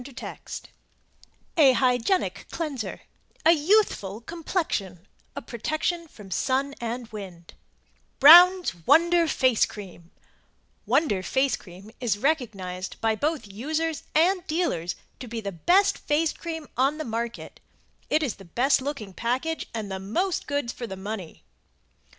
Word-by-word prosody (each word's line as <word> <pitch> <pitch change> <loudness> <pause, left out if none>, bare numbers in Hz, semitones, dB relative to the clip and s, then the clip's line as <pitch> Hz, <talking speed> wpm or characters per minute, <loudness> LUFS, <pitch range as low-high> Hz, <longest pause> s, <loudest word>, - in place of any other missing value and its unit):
] 245 - -10 1.5
A 275 -5 +7
HYGIENIC 250 +8 +1
CLEANSER 275 - -4 0.4
A 325 - +8
YOUTHFUL 300 - +2
COMPLEXION 230 - -3 0.3
A - - -6
PROTECTION 310 +9 -2
FROM 210 -9 -14
SUN 270 +8 0
AND 235 0 -4
WIND 185 -5 -9 0.7
Brown's 350 - +8
Wonder 335 +3 +5
FACE 255 -5 +3
CREAM 180 -5 -11 0.8
Wonder 235 - +2
Face 265 +7 +1
Cream 190 +4 -13
is 230 -5 0
recognized 200 -10 -2
by 225 -1 +1
both 295 +3 -1
users 305 +10 -3
and 355 +3 +3
dealers 310 - -1 0.2
to 255 - -7
be 230 0 -4
the 200 -2 -4
best 380 - +3
face 305 +2 +1
cream 325 -2 -6
on 270 +4 +2
the 310 - -4
market, 235 0 -5 0.5
is 300 -7 0
the 195 - -13
best 255 - +2
looking 260 -8 -5
package 260 - -2
and 215 -3 -5
the 190 - -3
most 340 - -2
goods 285 -4 -2
for 240 - -6
the 190 -2 -7
money. 195 -3 -7
255 Hz, 130 wpm, -26 LUFS, 205-320 Hz, 1.5 s, A